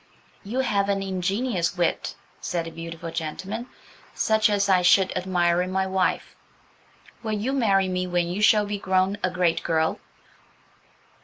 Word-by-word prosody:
"You 240 +6 -1
have 200 -5 0
an 195 -1 0
ingenious 190 0 -1
wit," 175 -1 -1 0.2
said 170 -2 -3
the 165 - -7
beautiful 165 0 -7
gentleman, 185 +9 -5 0.5
"such 220 -1 +2
as 200 -1 +1
I 185 -2 +4
should 185 +2 +4
admire 180 -2 +1
in 180 +1 -3
my 190 0 0
wife. 190 -1 -1 0.9
Will 220 -2 -3
you 240 +6 -2
marry 200 -8 +2
me 185 0 -2
when 175 -1 0
you 180 +4 -3
shall 215 -1 +5
be 205 0 -4
grown 190 +1 +1
a 185 - +2
great 180 -2 +1
girl?" 160 -1 0
190 Hz, 155 wpm, -25 LUFS, 175-205 Hz, 0.9 s, shall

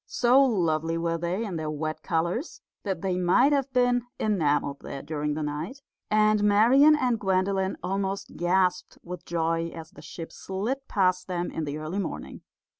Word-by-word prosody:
So 250 +2 +4
lovely 165 - +1
were 165 0 -1
they 180 +6 -2
in 185 -5 -4
their 155 -1 -3
wet 155 +1 -4
colours 170 - -2 0.2
that 190 -4 -4
they 185 -2 0
might 180 +10 +4
have 275 -1 0
been 245 -1 +3 0.2
enamelled 150 -8 0
there 140 - -7
during 150 -1 -2
the 155 - -3
night, 160 - -5 0.3
and 215 0 +3
Marian 240 +9 +6
and 250 -6 0
Gwendolen 190 0 0
almost 195 +1 -3
gasped 180 +1 +1
with 180 0 -8
joy 165 0 0
as 160 -1 -10
the 145 - -14
ship 165 +2 -8
slid 230 +9 -4
past 185 -2 +1
them 175 -1 -3
in 160 - -3
the 145 +1 -4
early 155 +6 -4
morning. 190 - -5
180 Hz, 170 wpm, -26 LUFS, 165-215 Hz, 0.3 s, Marian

